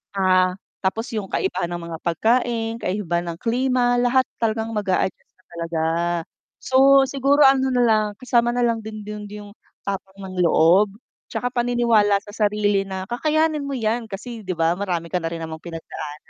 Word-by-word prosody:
ah, 185 -1 +3 0.2
tapos 220 +5 -2
yung 210 -4 -3
kaibahan 185 -2 -1
ng 175 0 -5
mga 165 - -4
pagkain 225 +5 0
kaibahan 175 -3 -2
ng - - -22
klima. 245 0 +1
Lahat 255 +1 +3 0.2
talagang 225 0 -1
mag-a-adjust 200 -3 -1
ka 185 - -32
talaga. 165 -1 -3 0.8
So 270 +1 +6
siguro 280 +2 +3
ano 265 0 +5
nalang, 220 -4 +2
kasama 240 -2 +2
nalang 235 -2 +1
din 215 0 -7
dun 210 -1 -7
yung 205 -1 -9 0.3
tapang 195 -1 -5
ng 185 -2 -4
loob, 185 +5 +4 0.3
tsaka 245 0 -3
paniniwala 235 -4 +3
sa 205 +1 -11
sarili 205 -2 +1
na 190 -1 -5
kakayanin 310 +6 +1
mo 280 -1 -3
yan, 225 0 -1
kasi 225 +3 -7
di 185 -4 -4
ba 165 +1 +2
marami 175 -3 -3
ka 180 - +1
na 165 - -2
rin 165 - -5
namang 160 0 -8
pinagdaanan. 165 -3 -7
210 Hz, 160 wpm, -22 LUFS, 185-240 Hz, 0.8 s, So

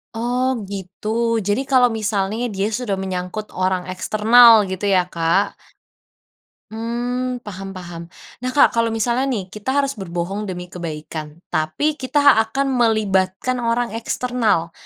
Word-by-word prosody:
Oh, 250 +3 0
gitu. 195 0 -8 0.3
Jadi 205 +4 0
kalau 250 -3 +4
misalnya 215 +2 -1
dia 205 +2 -2
sudah 210 -5 -2
menyangkut 190 +2 -4
orang 185 0 0
eksternal 220 +3 +6
gitu 190 +2 -2
ya 185 -2 +3
Kak? 170 +2 0 1.2
Mmm. 245 +2 -3
Paham 195 -1 -7
paham. 175 -2 -8 0.4
Nah 255 +1 -3
Kak, 290 - +6
kalau 230 0 +2
misalnya 240 +4 +1
nih 235 -8 -1
kita 210 +4 -6
harus 275 -1 +1
berbohong 190 +3 -4
demi 180 -1 -6
kebaikan, 155 -2 -6 0.2
tapi 155 - -1
kita 265 +3 0 0.2
akan 270 +5 -1
melibatkan 215 +1 +1
orang 235 0 0
eksternal, 230 -9 0
210 Hz, 130 wpm, -20 LUFS, 185-245 Hz, 1.2 s, eksternal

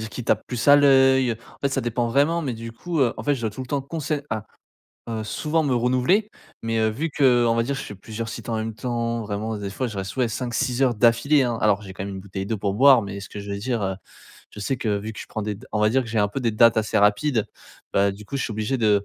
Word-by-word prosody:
dire 110 0 -6
qui 120 +4 -6
tape 110 - +1
plus 125 -2 -3
à 145 - +9
l'œil, 135 -3 +5
en 115 +1 -13
fait 140 - +2
ça 135 - -1
dépend 120 0 -1
vraiment. 150 +7 +2
Mais 130 -4 -2
du 115 0 -8
coup, 165 +8 -4
heu, 120 -3 +2
en - - -6
fait 145 -1 +2
je 120 - -8
dois 110 - 0
tout 105 - -9
le 130 - -5
temps 140 -1 0
qu'on 155 +4 -6
sait 145 0 -2
à 110 -2 -3 0.6
heu, 110 -1 -3
souvent 155 +8 -1
me 135 -4 +1
renouveler, 130 - +2 0.4
mais 115 0 0
heu, 110 - +3
vu 155 +9 -3
qu'on 120 -4 +4
va 115 - +2
dire 135 +3 -2
que - - -4
je - - -7
fais 105 - -8
plusieurs 110 +3 -6
sites 115 - -7
en 115 - -1
même 110 0 -3
temps, 115 -1 -2
vraiment 105 +1 -3
des 100 -1 -5
fois 130 +5 -2
je 110 -4 -6
reste 95 +4 -5
ouais 125 -2 +2
5-6 125 +2 -1
heures 125 -4 +2
d'affilée 125 +5 +4
hein. 120 -2 -1
Alors, 105 -1 +2
j'ai 95 -2 -9
quand 95 - -6
même 100 -1 -5
une 95 - -6
bouteille 95 0 -6
d'eau 110 -1 -2
pour 100 0 -1
boire, 130 0 +6
mais 100 0 -6
ce 100 - -9
que - - -8
je 100 0 -8
veux 100 - -3
dire, 120 +1 -2
heu, 95 -1 -1 0.6
je - - -13
sais 130 +6 -1
que 105 -4 -1
vu 110 +2 -6
que - - -9
je - - -8
prends 110 - -4
des 105 0 -3
da - - -14
on 105 - 0
va 105 - +4
dire 130 +2 +2
que 115 - -9
j'ai 110 0 -1
un 105 - +4
peu 135 +7 -4
des 115 - +1
dates 115 +1 +5
assez 110 -1 +1
rapides. 105 +3 +2 0.5
Bah 100 0 +3
du 105 +2 -11
coup 140 +7 -5
je 135 - -1
suis - - -3
obligé 110 +5 -1
de 105 -3 +4
115 Hz, 300 wpm, -23 LUFS, 105-130 Hz, 0.6 s, à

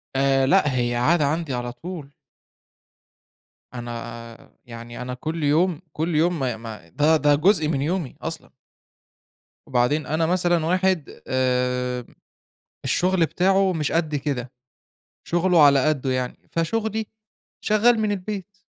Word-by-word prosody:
آآ 135 0 +3
لأ، 150 -3 +3
هي 120 -1 0
عادة 150 +6 +3
عندي 155 -1 -1
على 120 0 -3
طول. 155 +2 -8 1.6
أنا 115 -1 -8
يعني 120 +1 -9
أنا 125 0 -4
كل 160 +4 -4
يوم، 160 +3 +2
كل 160 +1 -2
يوم 170 +2 +2
ما 125 -4 -1
ما 110 -6 -10
ده 155 - +3
ده 145 -1 +3
جزء 160 0 +3
من 140 -4 0
يومي، 165 -2 -2
أصلًا. 160 -1 -5 1.2
وبعدين 135 +2 +1
أنا 160 +3 0
مثلًا 175 -1 +1
واحد 185 -2 0
آمم، 125 -1 -1 0.7
الشغل 180 -1 +2
بتاعه 190 +2 +2
مش 150 -3 -1
قد 160 -2 0
كده. 130 -3 -3 0.8
شغله 175 -1 +3
على 140 -1 +5
قده 140 -3 0
يعني. 125 -1 -4
فشُغلي 220 +6 -1 0.6
شغال 220 +2 +4
من 215 -1 +1
البيت 200 0 -5
150 Hz, 130 wpm, -23 LUFS, 125-175 Hz, 1.6 s, على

